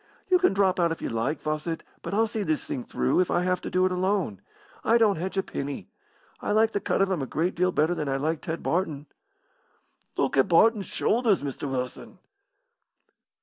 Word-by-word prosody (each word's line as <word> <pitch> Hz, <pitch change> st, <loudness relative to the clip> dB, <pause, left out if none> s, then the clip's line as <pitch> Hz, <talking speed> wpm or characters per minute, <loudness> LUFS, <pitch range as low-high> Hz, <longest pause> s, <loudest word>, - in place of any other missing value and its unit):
"You 365 Hz, -, +6 dB
can 365 Hz, -, +4 dB
drop 190 Hz, -2 st, +2 dB
out 170 Hz, -1 st, +3 dB
if 165 Hz, -, -3 dB
you -, -, -3 dB
like, 115 Hz, +7 st, -1 dB
Fawcett, 155 Hz, +2 st, -2 dB, 0.2 s
but -, -, -5 dB
I'll 220 Hz, +3 st, +3 dB
see 220 Hz, 0 st, -3 dB
this 155 Hz, -6 st, -1 dB
thing 125 Hz, -, -4 dB
through, -, -, 0 dB
if 180 Hz, -, +2 dB
I 175 Hz, -, +1 dB
have 180 Hz, 0 st, 0 dB
to -, -, -5 dB
do 185 Hz, 0 st, +2 dB
it 185 Hz, -, +1 dB
alone. 180 Hz, -, 0 dB, 0.4 s
I 230 Hz, -, +4 dB
don't 215 Hz, -5 st, +3 dB
hedge 190 Hz, +4 st, -4 dB
a 195 Hz, -, +2 dB
penny. 140 Hz, -5 st, -5 dB, 0.5 s
I -, -, -1 dB
like 220 Hz, +1 st, +4 dB
the 205 Hz, -, -1 dB
cut 195 Hz, -, +1 dB
of 195 Hz, -, 0 dB
him 175 Hz, -6 st, 0 dB
a 135 Hz, -, -3 dB
great 170 Hz, +7 st, -1 dB
deal 180 Hz, +2 st, +1 dB
better 160 Hz, +1 st, +2 dB
than 155 Hz, -5 st, -3 dB
I 135 Hz, -, 0 dB
liked 155 Hz, +3 st, -2 dB
Ted 160 Hz, +1 st, -4 dB
Barton." 160 Hz, -5 st, -1 dB, 1.1 s
"Look -, -, +1 dB
at 135 Hz, -, +5 dB
Barton's 200 Hz, +2 st, +4 dB
shoulders, 220 Hz, -, +1 dB
Mr. 140 Hz, 0 st, -4 dB
Wilson." 125 Hz, -1 st, -5 dB
180 Hz, 210 wpm, -26 LUFS, 150-195 Hz, 1.1 s, You